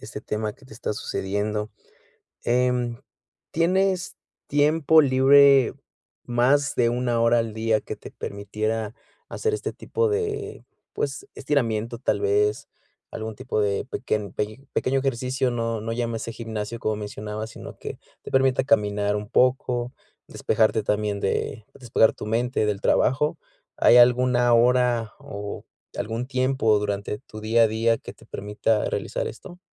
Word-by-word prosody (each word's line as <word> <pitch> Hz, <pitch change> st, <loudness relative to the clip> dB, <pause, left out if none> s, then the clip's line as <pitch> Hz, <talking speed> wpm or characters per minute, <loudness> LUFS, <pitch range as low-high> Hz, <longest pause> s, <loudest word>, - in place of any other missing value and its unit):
este -, -, -8 dB
tema 105 Hz, 0 st, -3 dB
que 135 Hz, -, -21 dB
te -, -, -14 dB
está 110 Hz, -, -3 dB
sucediendo. 105 Hz, +1 st, -3 dB, 0.7 s
Em, 125 Hz, -1 st, +1 dB, 0.5 s
¿tienes 185 Hz, +3 st, +1 dB, 0.3 s
tiempo 155 Hz, +2 st, +4 dB
libre, 135 Hz, -1 st, +6 dB, 0.5 s
más 135 Hz, +5 st, +2 dB
de 120 Hz, -1 st, +3 dB
1, 120 Hz, -1 st, 0 dB
hora 115 Hz, +1 st, +4 dB
al 115 Hz, -2 st, -2 dB
día, 110 Hz, -1 st, +1 dB
que -, -, -6 dB
te -, -, -12 dB
permitiera 105 Hz, +2 st, -3 dB, 0.3 s
hacer 440 Hz, -1 st, -2 dB
este -, -, -5 dB
tipo 460 Hz, 0 st, -1 dB
de, 425 Hz, -1 st, -3 dB, 0.3 s
pues, 400 Hz, -, -3 dB
estiramiento 115 Hz, -4 st, -1 dB
tal 125 Hz, -, -1 dB
vez, 420 Hz, 0 st, +1 dB, 0.4 s
algún 110 Hz, 0 st, -5 dB
tipo 130 Hz, -3 st, -3 dB
de 100 Hz, -1 st, 0 dB
pequen 105 Hz, -6 st, -3 dB
peño 110 Hz, +5 st, -4 dB
pequeño 135 Hz, +1 st, +1 dB
ejercicio, 130 Hz, 0 st, -1 dB
no 115 Hz, -2 st, -2 dB
no 115 Hz, -, -4 dB
llámese 115 Hz, -1 st, -3 dB
gimnasio, 110 Hz, 0 st, -5 dB
como 110 Hz, -1 st, -1 dB
mencionabas, 105 Hz, +1 st, -6 dB
sino -, -, -10 dB
que -, -, -7 dB, 0.2 s
te -, -, -9 dB
permita 130 Hz, -1 st, +3 dB
caminar 105 Hz, -6 st, +1 dB
un 105 Hz, 0 st, -5 dB
poco, 125 Hz, 0 st, +1 dB, 0.3 s
despejarte 110 Hz, -1 st, +1 dB
también 105 Hz, -1 st, -1 dB
de 105 Hz, +2 st, -2 dB
despejar 115 Hz, -3 st, +2 dB
tu -, -, -8 dB
mente 115 Hz, +1 st, 0 dB
del 105 Hz, -1 st, -1 dB
trabajo, 150 Hz, +4 st, +2 dB, 0.4 s
¿hay 120 Hz, -, +6 dB
alguna 125 Hz, 0 st, +5 dB
hora 120 Hz, -2 st, +3 dB
o 100 Hz, 0 st, -7 dB, 0.3 s
algún 115 Hz, +3 st, -3 dB
tiempo 130 Hz, -4 st, +2 dB
durante 105 Hz, 0 st, -3 dB
tu 110 Hz, -, -11 dB
día 115 Hz, +2 st, +3 dB
a -, -, +5 dB
día, 115 Hz, +1 st, +1 dB
que -, -, -10 dB
te -, -, -20 dB
permita 105 Hz, +2 st, -1 dB
realizar -, -, -2 dB
esto? 175 Hz, -, -10 dB
115 Hz, 145 wpm, -24 LUFS, 110-130 Hz, 0.7 s, libre